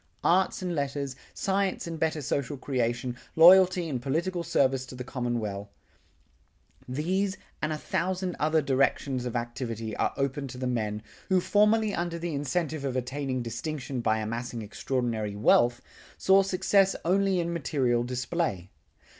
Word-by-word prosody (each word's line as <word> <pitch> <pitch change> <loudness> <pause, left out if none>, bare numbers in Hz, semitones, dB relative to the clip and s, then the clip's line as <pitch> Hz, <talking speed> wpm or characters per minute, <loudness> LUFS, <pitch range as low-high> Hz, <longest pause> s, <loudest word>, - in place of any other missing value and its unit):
Arts 185 +1 +2
and 180 -1 -2
letters, 140 -2 -2 0.2
science 195 -1 -1
and 165 -1 -5
better 160 -2 0
social 140 +2 -2
creation, 125 -2 -1 0.2
loyalty 180 +1 +7
and 130 -6 -3
political 170 +7 -1
service 135 -5 +1
to 130 - -9
the 125 - -5
commonweal, 120 -6 -3 1.2
these 185 +9 -1 0.2
and 155 - 0
a 155 - -1
thousand 185 +2 -2
other 155 0 +2
directions 135 -2 +1
of 120 - -5
activity 115 -2 -3
are - - +1
open 140 0 -1
to 125 - -9
the 130 - -3
men, 110 -4 -2 0.3
who 190 -1 +4
formerly 210 +3 +3
under 175 -1 -2
the 170 -1 -4
incentive 145 +2 -2
of 135 -2 -2
attaining 130 0 -2
distinction 130 +2 -4
by 110 -1 +2
amassing 115 +1 -4
extraordinary 110 -1 -2
wealth, 120 +3 +3 0.3
saw 190 +1 +5
success 195 +1 +2
only 190 +1 +2
in 170 0 -1
material 130 -6 +1
display. 125 - -2
140 Hz, 145 wpm, -28 LUFS, 120-175 Hz, 1.2 s, loyalty